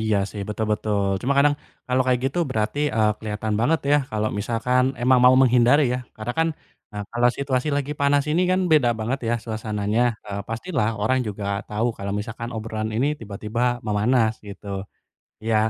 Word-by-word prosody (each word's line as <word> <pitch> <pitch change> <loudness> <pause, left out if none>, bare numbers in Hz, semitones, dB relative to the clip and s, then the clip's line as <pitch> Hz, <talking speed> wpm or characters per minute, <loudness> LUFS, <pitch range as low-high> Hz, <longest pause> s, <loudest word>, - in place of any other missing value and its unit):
Iya, 110 -1 +1
sih 105 - -7
betul 110 +1 -2
betul, 105 -1 0 0.2
cuma 135 - +1
kadang 145 +1 +5 0.3
kalau 130 +1 +2
kayak 125 -1 +2
gitu 140 +6 -2
berarti, 110 +4 -1
eee, 110 -1 +3
kelihatan 110 0 -3
banget 155 +7 +2
ya - - +7
kalau 110 0 0
misalkan 120 +4 +1 0.2
emang 125 +1 +5
mau 125 +1 +8
menghindari 125 +3 +5
ya, - - -1 0.2
karena 110 +3 -4
kan, 165 0 +3 0.4
eee, 105 0 -4
kalau 120 +1 +3
situasi 135 0 -1
lagi 145 0 -2
panas 140 0 +3
ini 165 +4 +2
kan 185 +1 +2
beda 140 -6 +5
banget 115 +5 -1
ya - - +2
suasananya, 110 -1 -2 0.3
eee, 100 -1 -4
pastilah 115 +1 -1
orang 130 +5 +2
juga 105 0 -5 0.2
tau 105 +2 0
kalau 100 0 -4
misalkan 115 +2 -5
obrolan 110 0 -3
ini 125 +5 +2
tiba-tiba 105 +1 -5 0.3
memanas 110 +2 +2
gitu. 100 0 -10 0.8
Iya, 110 0 +1
115 Hz, 175 wpm, -23 LUFS, 105-130 Hz, 0.8 s, mau